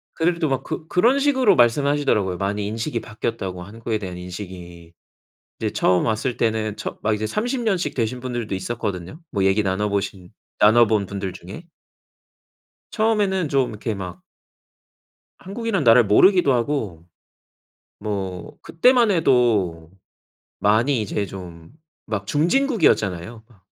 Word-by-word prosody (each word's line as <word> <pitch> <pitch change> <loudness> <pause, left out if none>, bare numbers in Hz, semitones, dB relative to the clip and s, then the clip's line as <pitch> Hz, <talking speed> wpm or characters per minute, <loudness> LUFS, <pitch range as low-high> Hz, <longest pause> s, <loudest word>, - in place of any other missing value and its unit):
그네들도 170 -2 0
막 135 0 -1
그 155 - -6
그런 240 +11 +3
식으로 265 -5 +3
말씀하시더라고요. 120 -6 +2
많이 100 +2 -2
인식이 115 +4 -3
바뀌었다고 100 -5 -5
한국에 110 +2 -4
대한 90 -3 -6
인식이. 90 -2 -9 0.7
이제 - - -2
처음 90 -1 +2
왔을 115 +3 -1
때는 110 -2 -1
처 - - -6
막 110 - +1
이제 105 +1 -3
30 240 - -2
년씩 195 -6 -1
되신 120 +1 -1
분들도 120 -5 -4
있었거든요. 95 - -4
뭐 100 -2 0
얘기 95 +2 +3
나눠보신 95 -1 -2 0.3
나눠본 110 -1 +4
분들 100 -1 -5
중에. 95 - -10 1.3
처음에는 205 -6 +1
좀 135 -3 +1
이렇게 110 +1 -4
막 90 -2 -7 1.2
한국이란 200 -3 -3
나라를 120 0 +7
모르기도 175 - +5
하고. 115 - -2 1.0
뭐 95 -4 -5
그때만 240 +5 +3
해도 110 - +2 0.7
많이 115 +5 +2
이제 105 0 -2
좀 85 -4 -10 0.4
막 105 -3 -3
중진국이었잖아요 145 - +1
막. 100 -6 -24
110 Hz, 300 characters per minute, -22 LUFS, 95-145 Hz, 1.3 s, 나라를